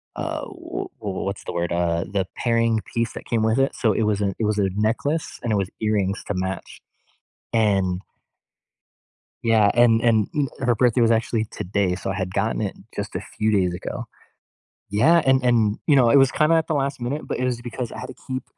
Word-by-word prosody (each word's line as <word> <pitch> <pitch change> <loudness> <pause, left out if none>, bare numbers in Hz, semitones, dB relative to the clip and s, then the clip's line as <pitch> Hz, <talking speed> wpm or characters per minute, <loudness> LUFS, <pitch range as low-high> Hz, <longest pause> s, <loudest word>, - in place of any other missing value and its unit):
uh, - - -3
w - - -6
wh - - -29
wh 100 -3 -3
what's 100 - -4
the - - -4
word? 85 0 -1
Uh, 85 -1 0
the 95 0 -1
pairing 115 -1 +2
piece 115 -1 0
that - - -8
came 115 -2 0
with 110 +4 +2
it. 135 - +1
So, 115 - +2
it 115 - 0
was 105 -1 +1
a 100 - +1
it 110 - +1
was 105 0 0
a 95 - +2
necklace, 120 +9 -1
and 115 - -1
it 105 - +2
was 100 -1 -1
earrings 105 -2 0
to 105 - -1
match. 95 0 -4 0.7
And 95 -5 +2 1.4
Yeah. 110 -3 +4
And 115 -1 +5
and 110 -3 +3
n 145 -2 +1
her 125 -2 +2
birthday 125 0 +3
was 115 0 +4
actually 110 0 +1
today, 100 -3 -1
so 95 - -4
I - - -3
had 95 -1 -3
gotten 110 0 0
it 100 - -3 0.2
just 100 0 -5
a - - -2
few 110 0 -2
days 90 -4 +2
ago. 90 - -5 0.9
Yeah. 160 +12 +4
And 130 -1 +4
and, 115 -4 +3
you 145 -3 +5
know, 120 -3 +5
it - - +6
was 135 -2 +6
kinda 155 +4 +3
at 160 - +1
the 155 - 0
last 140 -1 -1
minute, 135 +6 -3
but - - -3
it 130 - -1
was 125 -2 -1
because 120 0 -5
I - - -8
had - - -6
to 130 - -8
keep, 130 -1 -4
110 Hz, 225 wpm, -23 LUFS, 100-125 Hz, 1.4 s, it